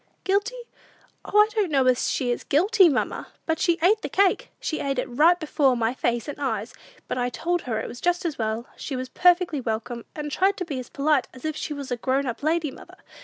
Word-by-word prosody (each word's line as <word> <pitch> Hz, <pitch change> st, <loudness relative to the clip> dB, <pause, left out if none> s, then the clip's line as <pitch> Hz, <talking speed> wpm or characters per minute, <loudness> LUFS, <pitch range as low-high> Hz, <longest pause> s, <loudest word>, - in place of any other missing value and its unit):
"Guilty? 410 Hz, +6 st, 0 dB, 0.7 s
O, -, -, 0 dB
I 420 Hz, 0 st, +7 dB
don't 420 Hz, -5 st, +1 dB
know 270 Hz, -3 st, +2 dB
as 255 Hz, -1 st, +2 dB
she 245 Hz, -2 st, 0 dB
is 240 Hz, -, -3 dB
guilty, 375 Hz, +5 st, +4 dB
mamma; 270 Hz, -, -1 dB, 0.2 s
but 320 Hz, -1 st, 0 dB
she 340 Hz, -1 st, +2 dB
ate 420 Hz, +4 st, +4 dB
the -, -, -4 dB
cake! 400 Hz, +6 st, +2 dB
She 310 Hz, -, -3 dB
ate 275 Hz, -1 st, -2 dB
it 250 Hz, -, 0 dB
right 315 Hz, +8 st, +4 dB
before 290 Hz, -5 st, +2 dB
my 230 Hz, +1 st, 0 dB
face 240 Hz, -3 st, -1 dB
and 290 Hz, 0 st, -6 dB
eyes; 225 Hz, -4 st, -2 dB, 0.3 s
but -, -, -2 dB
I 245 Hz, 0 st, 0 dB
told 345 Hz, +7 st, -1 dB
her 225 Hz, -3 st, -2 dB
it -, -, -4 dB
was 240 Hz, -, -9 dB
just 355 Hz, 0 st, +1 dB
as 320 Hz, -6 st, -2 dB
well, 220 Hz, +1 st, -2 dB
she 275 Hz, -, -5 dB
was 255 Hz, 0 st, -4 dB
perfectly 355 Hz, -5 st, +3 dB
welcome, 230 Hz, +1 st, -4 dB
and 295 Hz, -1 st, -5 dB
tried 385 Hz, +4 st, +2 dB
to 365 Hz, -, -3 dB
be 285 Hz, -6 st, -4 dB
as 250 Hz, -, -8 dB
polite 285 Hz, -2 st, +1 dB
as 255 Hz, -, -11 dB
if 310 Hz, -1 st, -2 dB
she 310 Hz, -, -5 dB
was 280 Hz, -2 st, -7 dB
a 245 Hz, -, 0 dB
grown 265 Hz, +3 st, 0 dB
up 240 Hz, -3 st, -4 dB
lady, 315 Hz, -1 st, 0 dB
mother. -, -, -14 dB
290 Hz, 235 wpm, -25 LUFS, 250-350 Hz, 0.7 s, I